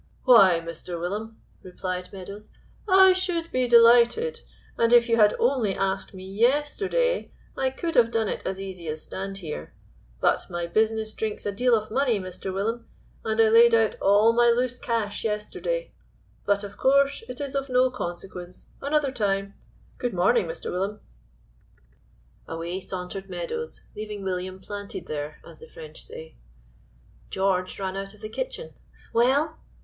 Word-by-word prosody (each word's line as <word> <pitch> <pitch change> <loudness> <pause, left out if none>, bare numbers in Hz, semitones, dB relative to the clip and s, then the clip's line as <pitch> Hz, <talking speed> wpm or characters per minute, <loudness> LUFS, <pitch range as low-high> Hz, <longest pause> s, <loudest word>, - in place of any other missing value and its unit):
"Why, 195 -9 +7
Mr. 170 +1 -7
Willum," 210 +6 -4 0.2
replied 180 0 -5
Meadows, 200 +2 -9 0.4
"I 380 0 +8
should 345 -3 -1
be 255 -1 +1
delighted, 240 - +5 0.3
and 230 0 +2
if 240 -1 +6
you 230 -1 +2
had 210 -2 +5
only 240 -6 +1
asked 195 0 -2
me 185 0 -9
yesterday, 295 - +1 0.2
I 265 - +1
could 330 +5 -4
have 230 -1 +5
done 225 -2 0
it - - -4
as 190 - -3
easy 185 -3 -6
as 155 0 -4
stand 195 +1 -5
here; 165 -6 -7 0.4
but - - +1
my 175 -1 -3
business 220 +4 0
drinks 215 -1 -4
a 205 - 0
deal 245 +4 +3
of 215 0 -6
money, 250 -3 +2
Mr. 185 0 -6
Willum, 225 +5 -2 0.4
and 220 0 -1
I 225 -1 +6
laid 230 +1 +7
out 225 -1 +2
all 205 +3 +5
my 240 0 +5
loose 250 +1 +1
cash 225 -4 -2
yesterday; 225 - -3 0.6
but, 200 0 +2
of 200 0 -8
course, 280 +1 +3
it 250 +2 -6
is 280 -2 -4
of 275 -1 -2
no 255 0 +3
consequence 180 -4 -7
another 285 -1 +1
time 200 -4 -1 0.5
good 245 -6 -2
morning, 445 - +3
Mr. - - -5
Willum." 195 +3 -2 1.5
Away 170 +3 -4
sauntered 190 +1 -6
Meadows, 190 - -5
leaving 210 -1 -6
William 185 0 -3
planted 205 +1 -7
there, 150 0 -5
as 165 -2 -11
the - - -12
French 155 -1 -10
say. 160 0 -11 0.9
George 190 -1 0
ran 190 -1 -3
out 195 +1 -6
of 210 - -20
the 215 - -6
kitchen. - - -5 0.4
"Well?" 280 +7 +2
215 Hz, 155 wpm, -25 LUFS, 190-250 Hz, 1.5 s, I